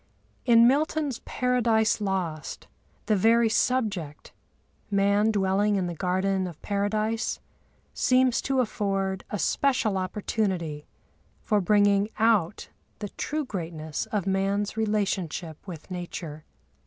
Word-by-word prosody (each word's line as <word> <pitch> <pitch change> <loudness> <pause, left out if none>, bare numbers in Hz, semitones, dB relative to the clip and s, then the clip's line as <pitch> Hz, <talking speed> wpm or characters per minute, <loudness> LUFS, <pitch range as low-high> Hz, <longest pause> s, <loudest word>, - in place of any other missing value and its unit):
In 235 -2 +7
Milton's 290 -1 +1
Paradise 230 -4 +1
Lost, 185 -6 -3 0.4
the 215 - +2
very 225 +3 +4
subject—Man 205 - -1
dwelling 205 0 +2
in 190 -2 0
the 175 - -3
garden 185 +2 0
of 170 -4 -10
Paradise—seems 220 +4 -1
to 270 -1 +1
afford 195 -4 -2
a 210 - -2
special 225 -2 +1
opportunity 185 -5 -2 0.6
for 210 -2 +2
bringing 205 +1 +3
out 215 -5 +1 0.3
the 205 - -5
true 305 +7 -3
greatness 160 - -5
of 205 -4 -2
man's 195 +2 0
relationship 195 -7 -1
with 170 0 -9
Nature. 170 -4 -6
200 Hz, 105 wpm, -26 LUFS, 185-225 Hz, 0.6 s, In